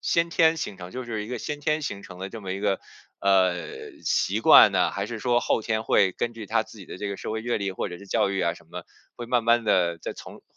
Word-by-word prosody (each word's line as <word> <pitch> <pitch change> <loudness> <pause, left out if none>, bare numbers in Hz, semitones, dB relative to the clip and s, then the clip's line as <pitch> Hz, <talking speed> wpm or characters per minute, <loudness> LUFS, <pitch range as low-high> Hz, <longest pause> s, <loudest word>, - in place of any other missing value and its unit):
先 170 0 +1
天 165 -1 +4
形 105 -10 -4
成， 90 0 -8
就 130 +4 -6
是 110 -3 -4
一 - - -10
个 125 0 -4
先 145 +5 -5
天 150 +1 0
形 100 -7 -4
成 90 -1 -11
的 95 - -5
这 115 - -8
么 95 -2 -5
一 95 - -4
个， 100 -2 0 0.4
呃， 95 -6 0
习 - - +1
惯 - - +8
呢， - - +2
还 100 +1 -3
是 115 -1 -6
说 120 +1 +2
后 115 - +1
天 110 -1 -1
会 100 -3 +3
根 120 - -2
据 110 -3 -9
他 - - +1
自 - - -15
己 - - -11
的 - - -8
这 105 - -3
个 100 - -4
社 - - -5
会 110 - -3
阅 120 -1 -1
历， 100 -1 -2
或 95 - -3
者 90 -1 -8
是 100 - -13
教 95 - +1
育 95 -1 -1
啊 85 - +1
什 85 - -18
么， - - -7 0.3
会 120 - -6
慢 120 -1 +1
慢 115 0 +4
地 85 -5 +2
再 - - -5
从 - - -11
105 Hz, 300 characters per minute, -25 LUFS, 95-120 Hz, 0.4 s, 惯